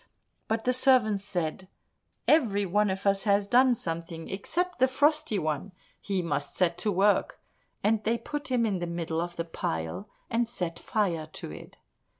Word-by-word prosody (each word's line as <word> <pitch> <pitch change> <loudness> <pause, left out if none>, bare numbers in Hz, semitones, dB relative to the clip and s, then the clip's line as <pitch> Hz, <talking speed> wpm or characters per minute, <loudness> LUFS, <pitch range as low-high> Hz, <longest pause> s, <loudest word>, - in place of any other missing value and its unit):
But 220 0 -1
the 250 - +3
servants 245 -6 +3
said, 185 -2 -3 0.6
"Every 220 -10 +4
one 205 +3 +2
of 190 +1 -3
us 195 0 +3
has 200 -1 +3
done 250 +2 +5
something 165 -3 -5
except 350 - -2
the 260 - +5
Frosty 285 -3 +2
One, 155 +3 -2 0.3
he 195 -3 -2
must 145 -3 -2
set 175 -2 +2
to 210 - 0
work," 200 +2 +2 0.4
and 215 0 +2
they 230 +2 +1
put 295 +3 -5
him 250 -3 +2
in 200 -4 0
the 175 - -3
middle 165 -1 -2
of 175 0 -4
the 165 - -3
pile, 80 - -4 0.2
and 230 0 0
set 175 -8 -4
fire 175 -8 -1
to - - -4
it. 75 - -11
200 Hz, 170 wpm, -28 LUFS, 170-230 Hz, 0.6 s, done